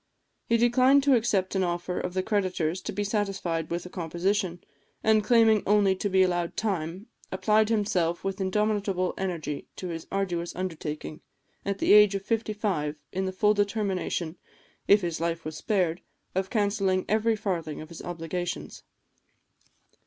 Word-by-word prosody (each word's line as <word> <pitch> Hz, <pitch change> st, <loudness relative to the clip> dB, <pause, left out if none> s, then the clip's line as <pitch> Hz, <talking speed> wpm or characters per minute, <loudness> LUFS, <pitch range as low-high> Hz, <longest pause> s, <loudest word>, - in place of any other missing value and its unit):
He 230 Hz, -, +3 dB
declined 255 Hz, +4 st, +4 dB
to 280 Hz, -1 st, +4 dB
accept 215 Hz, -6 st, +1 dB
an 190 Hz, -1 st, +1 dB
offer 175 Hz, 0 st, -2 dB
of 180 Hz, -, -4 dB
the 185 Hz, -, +1 dB
creditors 185 Hz, -4 st, 0 dB
to -, -, -4 dB
be 205 Hz, +2 st, -2 dB
satisfied 195 Hz, -6 st, -2 dB
with 170 Hz, +1 st, -3 dB
a -, -, -7 dB
composition; 175 Hz, +1 st, -1 dB, 0.4 s
and 215 Hz, -1 st, +4 dB
claiming 225 Hz, -1 st, +5 dB
only 200 Hz, -2 st, +4 dB
to 205 Hz, -, -1 dB
be 190 Hz, 0 st, +4 dB
allowed 175 Hz, -2 st, -1 dB
time, 185 Hz, -2 st, -2 dB, 0.3 s
applied 215 Hz, +3 st, +2 dB
himself 180 Hz, -6 st, 0 dB
with 195 Hz, 0 st, -3 dB
indomitable 195 Hz, -1 st, 0 dB
energy 165 Hz, -6 st, -4 dB
to 185 Hz, -, -6 dB
his 165 Hz, -1 st, -6 dB
arduous 175 Hz, -3 st, -2 dB
undertaking, 160 Hz, -4 st, -5 dB, 0.4 s
at 200 Hz, 0 st, -2 dB
the -, -, +4 dB
age 210 Hz, -1 st, +7 dB
of 195 Hz, -, -3 dB
fifty 225 Hz, -1 st, 0 dB
five, 180 Hz, -9 st, -1 dB, 0.2 s
in 190 Hz, +1 st, -2 dB
the -, -, -2 dB
full 210 Hz, +3 st, +3 dB
determination, 200 Hz, -5 st, -1 dB, 0.5 s
if 205 Hz, +1 st, +6 dB
his 170 Hz, -2 st, -3 dB
life 165 Hz, -1 st, -2 dB
was 155 Hz, 0 st, -5 dB
spared, 180 Hz, -5 st, 0 dB, 0.3 s
of 190 Hz, +1 st, -1 dB
cancelling 200 Hz, -3 st, +1 dB
every 220 Hz, +1 st, +2 dB
farthing 175 Hz, -8 st, -3 dB
of 155 Hz, -, -9 dB
his 170 Hz, -, -9 dB
obligations. 175 Hz, +1 st, -5 dB
190 Hz, 160 wpm, -27 LUFS, 175-210 Hz, 0.5 s, age